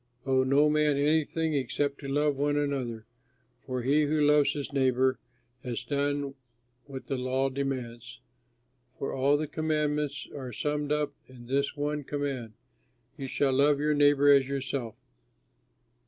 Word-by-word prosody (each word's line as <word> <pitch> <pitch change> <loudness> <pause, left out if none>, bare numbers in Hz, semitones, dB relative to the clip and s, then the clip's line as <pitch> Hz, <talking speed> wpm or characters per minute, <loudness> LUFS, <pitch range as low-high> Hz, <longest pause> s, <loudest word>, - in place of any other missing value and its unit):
Owe 130 -1 +3
no 140 +3 +4
man 150 -1 +2
anything, 155 +2 +1
except 140 +1 -1
to 140 - -7
love 145 +1 +1
one 145 +1 0
another, 130 -6 -2 0.6
for 130 -2 -3
he 145 +4 +3
who 150 +1 0
loves 150 -1 +4
his 145 0 -5
neighbor 130 -1 +2 0.4
has 120 -2 -4
done 145 -1 -1 0.5
what 135 -2 -8
the 135 -2 -3
law 130 +1 0
demands. 125 -3 -5 0.8
For 135 - -3
all 140 +2 +3
the 155 - -2
commandments 150 -2 -1
are 130 -3 -6
summed 150 +4 -2
up 150 -1 0
in 125 -2 -13
this 140 +4 0
one 145 0 -2
command: 135 -6 -4 0.6
"You 135 -3 -6
shall 135 0 +1
love 140 +2 +4
your 150 +1 +2
neighbor 145 -1 +5
as 135 -2 +4
yourself." 135 -4 -3
140 Hz, 145 wpm, -28 LUFS, 130-145 Hz, 0.8 s, neighbor